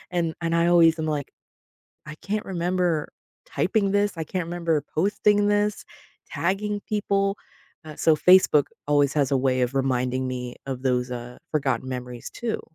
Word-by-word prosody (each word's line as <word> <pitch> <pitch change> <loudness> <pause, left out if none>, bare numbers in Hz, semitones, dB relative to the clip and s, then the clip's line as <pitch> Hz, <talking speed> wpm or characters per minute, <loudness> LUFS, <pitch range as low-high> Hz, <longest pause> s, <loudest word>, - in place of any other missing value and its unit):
And 170 -3 -1
and 165 0 0
I 170 0 +3
always 165 -2 +5
am 155 - -2
like, 150 -2 -3 0.8
"I 150 - -6
can't 210 +4 -2
remember 175 -3 0 0.4
typing 215 - 0
this, 205 -1 +1
I 165 - -3
can't 180 +1 -3
remember 170 -3 -1
posting 205 +3 +2
this, 205 0 0 0.5
tagging 205 +3 -1
people." 200 -1 0 0.5
Uh, 155 -1 -10
so 160 -1 +3
Facebook 180 -5 +5 0.2
always 145 -1 +3
has 140 -3 +1
a 135 - +4
way 130 -1 +1
of 125 +2 -1
reminding 130 -1 0
me 125 -1 -5
of 130 -2 -5
those, 125 -1 0
uh, 125 0 -7
forgotten 135 -5 -1
memories, 125 -2 -6
too. 235 -2 -3
160 Hz, 160 wpm, -24 LUFS, 130-195 Hz, 0.8 s, always